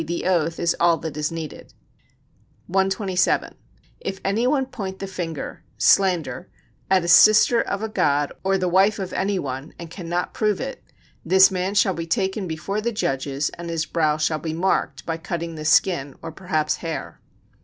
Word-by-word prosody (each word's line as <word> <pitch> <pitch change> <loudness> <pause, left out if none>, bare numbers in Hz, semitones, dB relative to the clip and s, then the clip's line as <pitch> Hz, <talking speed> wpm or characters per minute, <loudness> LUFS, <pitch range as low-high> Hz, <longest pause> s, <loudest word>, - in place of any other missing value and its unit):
_, - - -6
the 170 +1 -3
oath 170 -3 +1
is 170 - +1
all 170 -1 +4
that 160 -3 -6
is 150 +1 -2
needed]. 165 -2 -8 0.9
127. 190 0 +1 0.5
If 190 - -5
any 215 +5 +1
one 265 0 +2
point 195 -7 -6
the 195 - -5
finger 170 -5 -5 0.2
[slander] 175 -6 +2 0.4
at 190 -2 +3
a - - -3
sister 215 +6 +6
of 200 +2 -3
a - - -1
god 145 -8 +1
or 195 0 +2
the 185 -1 -1
wife 190 +4 +3
of 190 -2 -5
any 200 0 0
one, 135 -2 -5
and 170 -1 -9
cannot 175 -1 -3
prove 210 -3 0
it, 270 +1 -6 0.4
this 190 +3 +6
man 185 +2 -2
shall 205 -2 +3
be 165 -1 -5
taken, 190 +3 -1
before 195 +6 -3
the 235 +2 -1
judges 140 - -1
and 170 0 -6
his 165 -1 -1
brow 155 -2 +1
shall 155 0 0
be 160 0 -4
marked 180 +4 -1
[by 165 -1 -2
cutting 165 0 -4
the 155 -1 -7
skin, 150 -4 +2
or 165 - -5
perhaps 155 -3 -1
hair]. 165 -2 -6
175 Hz, 180 wpm, -23 LUFS, 160-195 Hz, 0.9 s, sister